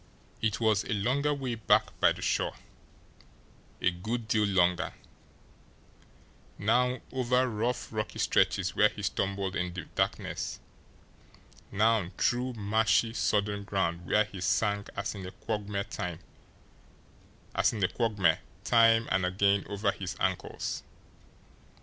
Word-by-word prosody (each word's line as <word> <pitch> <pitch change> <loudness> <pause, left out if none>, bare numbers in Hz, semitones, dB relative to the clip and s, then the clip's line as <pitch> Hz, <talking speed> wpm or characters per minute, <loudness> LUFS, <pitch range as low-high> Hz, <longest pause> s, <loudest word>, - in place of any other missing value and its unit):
It 110 -2 0
was 110 -3 +2
a - - -2
longer 130 +8 +1
way 135 -4 -2
back 115 -2 +2
by - - +5
the - - -5
shore, - - 0 1.2
a 95 - +2
good 110 +6 -4
deal 105 -1 +2
longer; 90 -2 +2 1.6
now 125 +5 +2
over 125 0 +2
rough, 120 +1 -2
rocky 110 0 -3
stretches - - +2
where - - +5
he - - -9
stumbled 100 -1 -1
in 90 0 -2
the 90 - -4
darkness, - - -2 1.1
now 105 -2 +2
through 125 +1 +1
marshy, 110 +1 +2
sodden 105 -3 0
ground 90 -4 -1
where 105 - +4
he 100 -3 -9
sank 100 +4 0
as - - -3
in 100 -3 -7
a 90 - -5
quagmire 105 -2 -3
time 90 -4 -5 2.9
and 95 0 +2
again 100 +2 +2
over 100 0 0
his 95 -2 -6
ankles. - - -2
105 Hz, 115 wpm, -29 LUFS, 95-115 Hz, 2.9 s, by